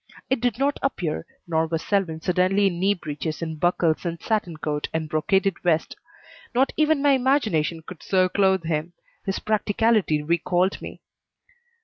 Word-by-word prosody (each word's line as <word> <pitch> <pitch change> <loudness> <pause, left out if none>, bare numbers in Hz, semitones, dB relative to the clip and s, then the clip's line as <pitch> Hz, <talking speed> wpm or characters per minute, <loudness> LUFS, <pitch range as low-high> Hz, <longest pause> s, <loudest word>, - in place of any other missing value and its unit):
It 265 -3 +1
did 245 -2 0
not 275 +2 0
appear, 175 - -2 0.2
nor 160 -1 +1
was 165 0 -2
Selwyn 180 -6 0
suddenly 185 +3 +2
in 175 -3 0
knee 195 +2 +3
breeches 155 -1 -5
and 160 -2 -5
buckles 170 -1 +1
and 170 -2 -3
satin 205 -7 -1
coat 150 -1 -3
and 160 -1 -1
brocaded 190 +5 +1
vest. 165 -3 +1 0.6
Not 265 +2 +2
even 305 -2 +2
my 285 - +5
imagination 220 - +1
could 185 -4 -10
so 185 -1 +2
clothe 190 -1 +2
him. 160 +1 -2 0.3
His 195 - 0
practicality 215 -6 +1
recalled 175 +4 +1
me. - - -9
180 Hz, 155 wpm, -24 LUFS, 160-210 Hz, 0.6 s, my